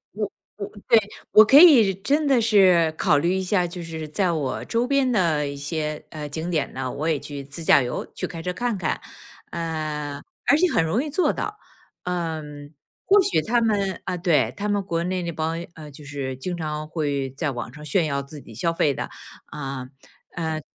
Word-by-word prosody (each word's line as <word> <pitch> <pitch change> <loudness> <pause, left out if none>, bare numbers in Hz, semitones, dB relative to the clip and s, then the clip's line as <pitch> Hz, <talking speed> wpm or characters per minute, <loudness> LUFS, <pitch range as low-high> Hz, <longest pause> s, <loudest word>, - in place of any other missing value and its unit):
我 210 -1 -2 0.3
我 200 0 -4 0.2
对， 230 - +7 0.3
我 215 - +9
可 270 +6 +7
以 250 - +8
真 285 - 0
的 265 -4 +4
是 185 -7 +5
考 145 - +3
虑 170 +5 +1
一 190 - 0
下， 180 -1 +1
就 175 0 -7
是 160 -2 -6
在 180 +3 0
我 140 -5 -2
周 235 +1 0
边 275 -1 +2
的 165 -9 +2
一 140 - -6
些， 150 +1 -3
呃， 150 -1 -6
景 160 +4 -4
点 155 -4 -1
呢， 130 -1 -3
我 155 +3 -3
也 155 -3 +2
去 145 -1 -7
自 145 +5 -9
驾 140 - +6
游， 125 0 -3
去 - - -3
开 165 - -7
车 180 +1 -2
看 240 +1 -1
看。 160 - -1 0.5
呃， 155 -3 -3 0.3
而 290 - +6
且 360 +2 +3
很 165 - +3
容 165 - +1
易 300 - -5
做 360 +5 +2
到。 420 0 -4 0.5
嗯， 155 -4 -4 0.3
或 405 +1 +6
许 165 - +1
他 240 +1 +2
们 200 -5 0
呃， 180 - -2
对， 150 - +2
他 210 +1 -3
们 205 -1 +1
国 170 -3 -2
内 185 0 -1
那 170 -1 -3
帮， 160 +1 -2 0.2
呃， 155 -2 -10
就 145 +1 -13
是 140 -3 -4
经 175 +6 -4
常 155 -1 -4
会 145 -4 -2
在 145 +3 -2
网 120 -1 -6
上 150 +2 -11
炫 165 +3 +1
耀 140 -1 -1
自 140 +1 -11
己 115 - -13
消 170 +9 0
费 145 -3 +2
的， - - -4 0.4
啊， 135 -2 -6 0.5
呃， 160 -2 -2
165 Hz, 220 characters per minute, -24 LUFS, 150-195 Hz, 0.5 s, 我